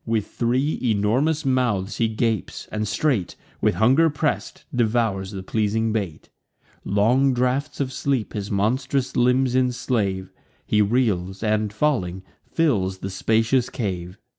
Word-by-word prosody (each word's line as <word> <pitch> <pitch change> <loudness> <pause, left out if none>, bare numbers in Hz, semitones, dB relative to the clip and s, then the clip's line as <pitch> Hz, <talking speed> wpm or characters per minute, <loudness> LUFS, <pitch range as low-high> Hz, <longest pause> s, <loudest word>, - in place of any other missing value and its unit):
With 110 -2 -1
three 130 +5 0
enormous 125 +8 +1
mouths 120 -7 0
he 115 - +2
gapes; 110 -1 -2
and 105 0 -2
straight, 120 - 0 0.3
With - - +2
hunger 135 +9 +4
press'd, 150 0 -2
devours 110 -5 +1
the 95 -2 -6
pleasing 110 +2 0
bait. 95 -8 -4 0.5
Long 125 +7 +2
draughts 130 +4 -1
of 130 -2 -2
sleep 135 -4 -1
his 100 -1 -4
monstrous 130 +6 0
limbs 125 +1 +3
enslave; 120 -7 0 0.3
He 105 - +2
reels, 100 -4 0
and, 105 -1 +1
falling, 105 -8 -1 0.3
fills 100 - +1
the 95 +1 -6
spacious 115 +6 +1
cave. 95 -6 -4
115 Hz, 130 wpm, -23 LUFS, 100-130 Hz, 0.5 s, hunger